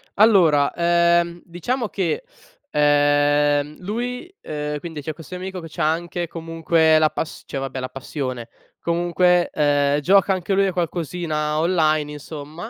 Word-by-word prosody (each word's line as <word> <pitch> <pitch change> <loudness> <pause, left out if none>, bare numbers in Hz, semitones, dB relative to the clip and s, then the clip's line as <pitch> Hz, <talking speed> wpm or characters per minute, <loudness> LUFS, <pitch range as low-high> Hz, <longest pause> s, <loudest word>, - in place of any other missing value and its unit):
Allora, 175 -10 +5
ehm, 170 0 +2
diciamo 215 +8 -3
che, 190 - -2 0.5
ehm, 145 0 +2
lui, 245 - -5
ehm 150 -1 -4
quindi 160 -2 -7
c’è 155 +2 -5
questo 165 +4 -10
mio 180 - -7
amico 190 0 -5
che 165 - -9
c’ha 155 0 0
anche, 175 +1 -3
comunque, 165 -1 +2
la 155 0 +4
pas 160 - -5
cioè - - -6
vabbè 135 -1 -4
la 130 0 -4
passione, 130 -3 -5 0.3
comunque 175 +1 +2
ehm, 145 -1 +2
gioca 195 +6 +4
anche 185 +1 -2
lui 195 0 +3
a 190 - -2
qualcosina 160 -3 -2
online 155 -3 +1
insomma; 150 +6 -8
165 Hz, 145 wpm, -22 LUFS, 150-180 Hz, 0.5 s, Allora